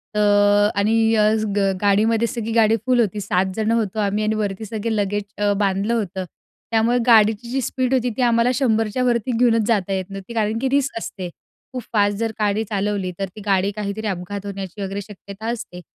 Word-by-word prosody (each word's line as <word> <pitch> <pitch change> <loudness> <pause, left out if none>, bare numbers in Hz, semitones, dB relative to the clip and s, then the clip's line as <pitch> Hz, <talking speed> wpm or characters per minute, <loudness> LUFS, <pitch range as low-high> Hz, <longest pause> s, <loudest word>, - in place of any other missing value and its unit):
तर 205 0 +4
आणि 215 +3 +2 0.6
गा 195 -1 +2
गाडीमध्ये 220 +3 +3
सगळी 230 -3 -4
गाडी 225 -1 +4
फुल 255 -1 +3
होती, 210 -2 +1
7 190 -1 +1
जण 220 0 0
होतो 220 -2 0
आम्ही 205 +1 0
आणि 215 +1 0
वरती 210 0 -3
सगळे 220 +1 -3
लगेज 205 0 -1
अ, 205 0 +1
बांधलं 200 +2 0
होतं. 190 -4 -2 0.5
त्यामुळे 230 +2 +2
गाडीची 220 0 +4
जी 270 +2 -1
स्पीड 255 +1 -1
होती, 250 -1 +2
ती 260 - 0
आम्हाला 235 +1 +3
100 225 -5 +1
च्या 255 - 0
वरती 240 0 +1
घेऊनच 230 -3 +3
जाता 195 -4 +1
येत 190 -1 -2
नव्हती, 195 +3 -8
कारण 220 0 0
की 265 - 0
रिस्क 275 -2 0
असते. 190 -5 -5 0.4
खूप 250 - -4
फास्ट 205 -1 +2
जर 225 +1 -1
गाडी 210 +1 +1
चालवली, 200 -2 -1
तर 195 - 0
ती 215 - -9
गाडी 195 0 +2
काहीतरी 210 +1 -4
अपघात 195 +1 -4
होण्याची 195 0 -6
वगैरे 195 +1 -3
शक्यता 200 +1 -10
असते. 220 -7 -7
210 Hz, 190 wpm, -21 LUFS, 200-230 Hz, 0.6 s, तर